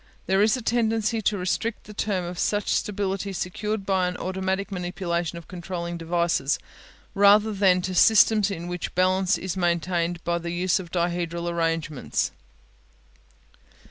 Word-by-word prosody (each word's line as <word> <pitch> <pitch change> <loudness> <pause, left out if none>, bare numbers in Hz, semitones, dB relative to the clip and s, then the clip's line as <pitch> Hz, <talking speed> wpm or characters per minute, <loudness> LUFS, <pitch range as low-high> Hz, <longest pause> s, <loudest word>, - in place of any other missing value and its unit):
There 190 +1 +2
is 215 +4 +4
a 250 - -7
tendency 225 -1 +1
to 210 0 +1
restrict 200 +5 -2
the 210 - -11
term 200 -3 -1
to 175 - -4
such 205 -1 0
stability 195 -1 -2
secured 200 +3 -3
by 190 -2 +1
automatic 190 +2 -2
manipulation 175 -2 -3
of 170 - -11
controlling 175 -1 -5
devices, 170 -4 0 0.6
rather 205 +2 +5
than 190 -2 +3
to 185 - -2
systems 215 +1 +5
in 175 -3 -5
which 180 0 -5
balance 185 +1 +2
is 185 -1 -4
maintained 175 -1 0
by 170 0 0
the 170 0 -5
use 175 +2 +1
of 180 -2 -8
dihedral 170 -1 -1
arrangements. 165 - -1
185 Hz, 140 wpm, -25 LUFS, 170-200 Hz, 0.6 s, rather